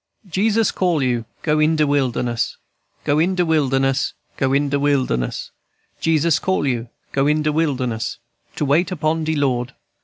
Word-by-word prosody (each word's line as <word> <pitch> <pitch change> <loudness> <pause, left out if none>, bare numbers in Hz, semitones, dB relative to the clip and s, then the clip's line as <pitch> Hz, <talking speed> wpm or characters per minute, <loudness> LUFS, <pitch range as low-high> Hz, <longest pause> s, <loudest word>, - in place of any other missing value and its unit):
"Jesus 210 +4 +2
call 175 -6 +1
you. 120 -3 0 0.2
Go 155 -1 +2
in 155 +1 +3
de 155 -1 +3
wilderness, 125 -4 0 0.5
Go 145 +1 +2
in 180 +4 +2
de 180 -1 +2
wilderness, 135 -4 +1 0.2
go 135 -1 0
in 140 +1 +2
de 140 0 0
wilderness, 130 - 0 0.5
Jesus 160 0 +2
call 190 -5 0
you. 120 -3 -1 0.2
Go 140 +1 +1
in 150 +1 +2
de 150 - +1
wilderness 130 -7 -1 0.4
To 150 - -1
wait 160 +7 +2
upon 160 -1 0
de 160 0 0
Lord. 125 -4 0
145 Hz, 160 wpm, -20 LUFS, 130-160 Hz, 0.5 s, in